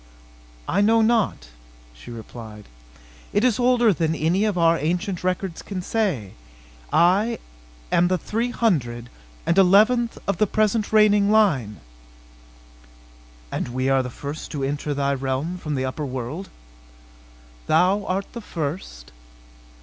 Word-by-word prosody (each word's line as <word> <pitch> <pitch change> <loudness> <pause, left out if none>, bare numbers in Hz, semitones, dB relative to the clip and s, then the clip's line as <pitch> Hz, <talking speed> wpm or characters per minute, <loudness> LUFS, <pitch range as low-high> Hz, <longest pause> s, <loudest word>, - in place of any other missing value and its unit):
"I - - +1
know 225 +2 +4
not," 220 - +1 0.4
she - - -14
replied. 110 -2 -10 0.7
"It 205 - +2
is 250 -2 +2
older 245 -3 +4
than 160 -1 0
any 170 +7 +1
of 210 -4 -1
our 165 -1 +4
ancient 180 +5 -2
records 185 -1 -2
can 185 -3 -6
say. 180 - -1 0.6
I 200 +7 +3 0.5
am 175 - +4
the 185 0 +1
three 225 +7 -2
hundred 125 - -1 0.3
and 170 +3 +3
eleventh 220 +6 +4
of 200 - -1
the 215 - +3
present 215 +1 0
reigning 210 -2 +4
line." 150 - +2 1.7
"And - - -3
we 130 +2 -1
are 135 -1 +3
the 125 - -5
first 145 +5 -7
to 140 -3 -3
enter 145 +1 -2
thy 140 0 0
realm 135 +6 -3
from 150 -3 -3
the 130 -1 -1
upper 140 +3 -4
world?" 130 +8 -5 1.2
"Thou 195 +3 +3
art 195 +2 -3
the 235 - -6
first." 145 - -6
180 Hz, 135 wpm, -23 LUFS, 135-210 Hz, 1.7 s, know